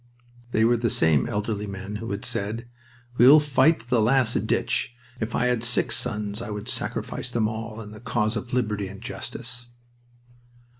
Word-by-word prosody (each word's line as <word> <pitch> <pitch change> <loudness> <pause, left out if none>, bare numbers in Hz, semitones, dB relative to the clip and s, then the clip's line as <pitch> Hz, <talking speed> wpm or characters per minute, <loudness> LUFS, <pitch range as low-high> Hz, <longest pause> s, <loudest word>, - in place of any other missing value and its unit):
They 110 -2 +3
were 120 +1 +4
the 115 0 0
same 80 -8 +3
elderly 105 0 -2
men 100 +1 -5
who 115 +2 -6
had 100 +1 -4
said: 110 +4 -3 0.5
"We'll 135 +5 +9
fight 145 0 +3
to 115 - -16
the 120 -2 +3
last 120 +1 +2
ditch. 120 - 0 0.2
If 110 +1 -2
I 125 - +2
had 125 -2 +1
six 120 0 0
sons 105 -2 -3
I 120 - -5
would 105 -1 -5
sacrifice 125 - -2
them 115 -3 +1
all 110 0 -5
in 105 -1 -9
the 110 - -10
cause 115 -2 0
of 120 +3 -5
liberty 105 -5 0
and 95 +1 -9
justice." 120 0 -6
115 Hz, 180 wpm, -25 LUFS, 105-120 Hz, 0.5 s, We'll